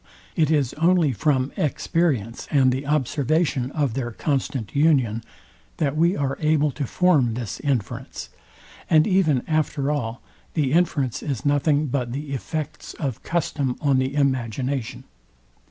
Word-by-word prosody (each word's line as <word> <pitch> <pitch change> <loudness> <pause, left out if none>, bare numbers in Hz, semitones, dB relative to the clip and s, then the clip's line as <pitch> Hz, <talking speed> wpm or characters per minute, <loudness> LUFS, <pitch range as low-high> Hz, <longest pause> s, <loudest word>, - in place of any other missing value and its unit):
It 155 -4 +2
is 145 -6 +1
only 170 -3 +4
from 130 +1 +1
experience 140 - -1
and 135 -3 +4
the 135 +2 -3
observation 145 -1 +1
of 145 -6 0
their 120 -1 -2
constant 130 -2 -2
union, 135 -7 +3 0.5
that 145 -2 0
we 170 +4 +2
are 140 -1 -2
able 150 -1 +2
to 140 0 -4
form 145 -11 +3
this 120 -3 -5
inference; 130 -9 -3 0.6
and 155 -1 +5
even 170 - +2
after 150 -2 0
all, 120 -5 -2 0.4
the 145 -5 +1
inference 155 -7 +1
is 135 -5 -4
nothing 145 +1 +2
but 125 -3 -2
the 145 +1 -5
effects 150 +3 -5
of 130 -6 -4
custom 145 -6 -1
on 140 -3 +2
the 130 +2 -1
imagination. 130 -2 -1
140 Hz, 140 wpm, -23 LUFS, 130-155 Hz, 0.6 s, and